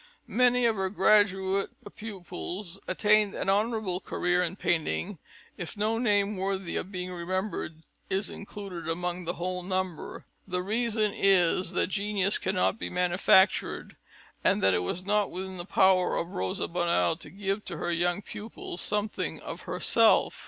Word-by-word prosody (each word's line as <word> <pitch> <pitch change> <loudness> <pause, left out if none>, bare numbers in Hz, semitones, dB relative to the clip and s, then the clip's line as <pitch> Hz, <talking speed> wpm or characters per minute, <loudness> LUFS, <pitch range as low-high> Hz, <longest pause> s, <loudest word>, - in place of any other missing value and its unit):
Many 250 0 +3
of 225 -2 +2
her 190 0 0
graduate 195 -1 +3 0.3
pupils 195 -2 -6
attained 210 +1 +3
an - - -2
honourable 210 -3 0
career 180 -1 0
in 180 +1 -1
painting, 175 0 0
and 205 - -8 0.4
if 175 +3 -6
no 220 +2 +1
name 205 -3 +2
worthy 190 -1 -2
of 190 - -3
being 180 -1 -4
remembered 180 -2 -3 0.3
is 195 +1 0
included 195 -5 -7
among 175 +1 -2
the 175 - -1
whole 180 +1 -3
number, 185 -2 -3 0.2
the 180 -1 -2
reason 215 +1 0
is 185 -2 +3
that - - +1
genius 200 -1 0
cannot 190 +3 0
be - - -3
manufactured 180 +2 +3 0.5
and - - +2
that 95 0 +5
it 90 - +2
was 170 - -3
not 205 0 +2
within 190 +1 -6
the 175 - -6
power 190 -1 +3
of 170 - -2
Rosa 95 0 -2
Bonheur 170 -1 +1
to - - -8
give 195 +1 -3
to 170 - -5
her 175 - -2
young 175 +3 0
pupils 210 -4 -7
something 210 +1 -1
of - - -7
herself. - - +3
190 Hz, 155 wpm, -28 LUFS, 180-205 Hz, 0.5 s, that